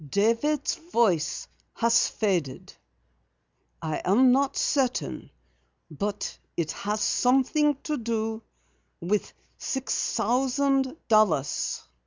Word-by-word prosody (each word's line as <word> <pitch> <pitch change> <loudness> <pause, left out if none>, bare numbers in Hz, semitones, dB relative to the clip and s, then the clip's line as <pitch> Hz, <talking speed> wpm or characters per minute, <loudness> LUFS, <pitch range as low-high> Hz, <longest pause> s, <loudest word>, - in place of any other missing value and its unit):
"David's 230 - +1
voice 180 - +1 0.3
has 230 0 +3
faded. 175 - -2 1.1
I 155 -1 -2
am 245 +7 +5
not 270 +1 +1
certain, 255 - -1 0.6
but 205 +7 -4 0.2
it 165 -2 -1
has 210 +1 -3
something 270 +6 +2
to 305 -1 -2
do 225 -1 -2 0.6
with 195 +4 -1 0.3
six 265 -1 -2
thousand 265 +4 +1
dollars." 210 - +2
230 Hz, 90 wpm, -26 LUFS, 200-265 Hz, 1.1 s, am